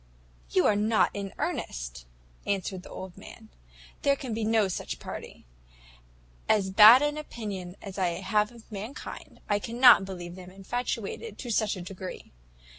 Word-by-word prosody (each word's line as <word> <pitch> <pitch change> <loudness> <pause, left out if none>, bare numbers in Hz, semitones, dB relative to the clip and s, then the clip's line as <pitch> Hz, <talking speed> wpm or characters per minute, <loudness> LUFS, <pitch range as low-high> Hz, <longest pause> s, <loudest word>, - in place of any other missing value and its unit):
"You - - +3
are 210 - +4
not 215 +2 +2
in 200 -1 -5
earnest!" - - -4 0.4
answered 190 -2 -2
the - - -13
old 185 -1 -8
man; - - -13 0.5
"there 280 0 +3
can 260 -4 -5
be 225 0 -2
no 220 -1 +3
such 185 - -4
party. - - -9 1.0
As 195 -3 +3
bad 220 +7 +9
an 295 +1 0
opinion 200 -10 -6
as 195 -1 -7
I 175 -2 0
have 210 +3 +1
of 235 -1 -16
mankind, 215 +7 -8
I 205 -1 +1
cannot 235 -2 +6
believe 175 -2 -7
them 180 0 -10
infatuated 230 - -4
to 245 - -5
such 215 -1 +1
a 185 - -7
degree. 185 0 -8
205 Hz, 155 wpm, -28 LUFS, 185-230 Hz, 1.0 s, bad